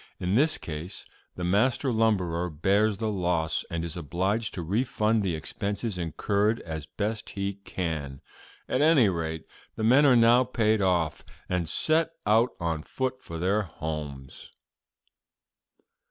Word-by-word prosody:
In 90 +1 -1
this 150 +8 +3
case 80 +3 -7 0.3
the 90 - -5
master 120 +9 +2
lumberer 90 -6 +1
bears 100 +7 +1
the 110 -1 -1
loss, 85 -5 0
and 85 0 -3
is 85 - -5
obliged 95 +7 -1
to 90 - -4
refund 110 +3 +1
the 95 -4 -1
expenses 100 +6 -3
incurred 100 +6 0
as 80 -2 -6
best 105 +1 -3
he 100 0 -3
can. 80 -8 -4 0.5
At 130 - 0
any 150 -8 +5
rate, 80 -2 -3 0.3
the 110 - -4
men 130 +6 +6
are 130 - +6
now 120 +2 +6
paid 110 -4 +1
off, 85 -5 +1 0.2
and 90 -3 -1
set 160 +1 +1
out 110 +4 +4
on 85 -3 -1
foot 130 +8 -3
for 85 - -7
their 95 +5 +1
homes.'" 75 -6 -7
100 Hz, 140 wpm, -27 LUFS, 85-110 Hz, 0.5 s, men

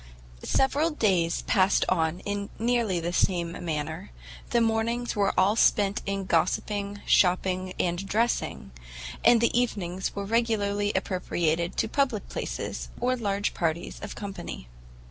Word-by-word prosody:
Several 285 +4 +2
days 190 - +1
passed 190 -1 +3
on 160 +2 0 0.3
nearly 230 -5 +1
in 170 - -3
the 175 +1 -2
same 175 -2 +1
manner; 155 - -4 0.4
the 235 - +3
mornings 230 +2 0
were 200 -1 +2
all 195 +3 +4
spent 205 -3 +3
in 195 -1 -2
gossipping, 200 +4 0
shopping 185 0 +2
and 175 +1 0
dressing, 220 - -1 0.5
and 235 -1 +6
the 235 - +2
evenings 190 -7 -1
were 200 0 -3
regularly 205 -2 +1
appropriated 175 -3 -1
to - - +1
public 260 -7 0
places, - - -4
or 255 +1 +1
large 205 -4 -1
parties 170 0 -2
of 205 - -6
company. 195 - -7
200 Hz, 130 wpm, -27 LUFS, 175-225 Hz, 0.5 s, and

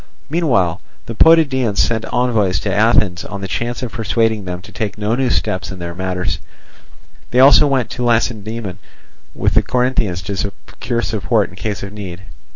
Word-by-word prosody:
Meanwhile 120 - +1 0.2
the 115 - -5
Potidæans 130 -7 +4
sent 110 -1 +1
envoys 110 -8 +1
to 100 - -2
Athens 105 -5 +3
on 100 -1 -7
the 95 - -4
chance 120 +5 -3
of 120 - -4
persuading 110 -2 0
them 90 -1 -4
to - - -13
take 105 -2 -4
no 105 +1 -1
new 130 +1 +1
steps 95 -1 -1
in 95 - -7
their 85 -1 -6
matters; 90 0 -2 0.9
they 125 - +1
also 140 +2 +7
went 130 -4 0
to 125 - -4
Lacedaemon 110 -4 -1 0.6
with - - +1
the - - +5
Corinthians 125 -8 0
to 100 +4 -4
secure 110 +4 -4
support 110 -2 0
in - - -13
case 100 +1 -4
of 100 +1 -7
need. 95 -4 -7
110 Hz, 170 wpm, -18 LUFS, 95-120 Hz, 0.9 s, also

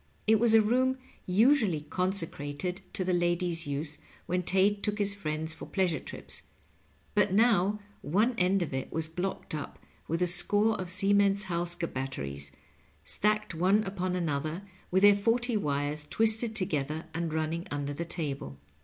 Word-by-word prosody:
It 220 0 +4
was 230 -1 +4
a 220 - +6
room 255 +4 +1 0.3
usually 210 - +3
consecrated 180 0 -1
to 185 - -1
the 185 0 0
ladies' 175 -2 0
use 145 +2 -3 0.3
when 180 +1 -1
Tate 195 +3 +2
took 210 0 -1
his 200 -1 +1
friends 160 -4 -4
for - - -10
pleasure 185 -4 0
trips, - - -7 0.7
but 205 -3 +2
now 210 -2 +3 0.2
one 210 - +1
end 185 +1 +2
of 155 - -6
it 130 - -4
was 160 -1 -2
blocked 180 +3 -4
up 150 -2 -5 0.3
with 165 +3 0
a - - +4
score 205 +5 +5
of 180 - -6
Siemens 200 +1 +4
Halske 175 -1 -1
batteries, 70 - -5 0.5
stacked 215 -1 0
one 190 +6 +2
upon 185 -2 -3
another, 155 +1 -2 0.3
with 190 +2 +2
their 205 0 +8
forty 230 +4 0
wires 150 -4 -1
twisted 220 0 +2
together 155 -5 -1
and 165 0 -3
running 160 +2 -2
under 145 0 -3
the 165 - -4
table. 140 - -4
180 Hz, 155 wpm, -29 LUFS, 155-205 Hz, 0.7 s, their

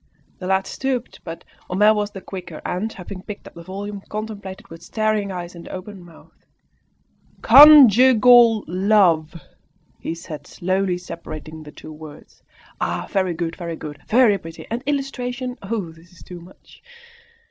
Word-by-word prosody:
The 185 - -6
lad 190 0 +1
stooped, 260 -2 -4
but 165 0 -8 0.3
Homais 210 +4 +4
was 210 -1 -2
the 195 -2 -10
quicker, 180 -5 -8
and, 200 +5 -3
having 185 -1 -9
picked 205 +1 -9
up - - -12
the 170 - -11
volume, 200 +3 -7
contemplated 210 -3 -6
it - - -23
with 165 0 -11
staring 215 +1 -1
eyes 175 -1 -6
and 170 -1 -11
open 190 0 -9
mouth. 170 -2 -19 1.0
"CONJUGAL 245 -4 +8
LOVE!" 180 -4 +2 0.6
he 165 - -5
said, 155 -4 -9
slowly 185 0 -1
separating 160 -3 -9
the 150 -1 -11
two 155 - -11
words. 155 -1 -14 0.4
"Ah! - - -2
very 185 -3 0
good! 165 0 -3
very 170 -2 -6
good! 150 -2 -9
very 225 -4 +4
pretty! 165 0 -10
And 235 +2 -2
illustrations! 255 -3 -3
Oh, 195 -4 -4
this 165 +2 -19
is 180 - -17
too 175 -1 -10
much!" 180 +3 -18
190 Hz, 155 wpm, -21 LUFS, 170-215 Hz, 1.0 s, CONJUGAL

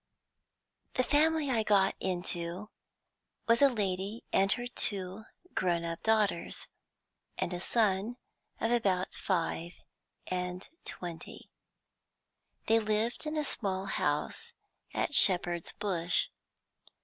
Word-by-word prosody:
"The 255 - +3
family 300 +1 +3
I 230 -3 +2
got 200 -3 +4
into 180 +1 -3 0.8
was 235 +2 +4
a 280 - +8
lady 200 -1 -2
and 195 0 +4
her 245 - -4
two 200 -3 -3 0.3
grown 175 -2 +1
up 165 0 -4
daughters, 215 -6 +1 0.7
and 175 - -1
a 175 - -3
son 215 +3 +1 0.4
of 225 - 0
about 195 -6 +1
five 170 -2 -1 0.5
and 180 0 -3 0.2
twenty. 175 -2 -7 1.1
They 225 +1 +4
lived 220 +6 0
in 305 +1 -2
a 305 - +1
small 195 -8 -1
house 195 - -1 0.4
at - - -1
Shepherd's 175 - +5
Bush. 180 -4 +1
195 Hz, 110 wpm, -31 LUFS, 180-230 Hz, 1.1 s, a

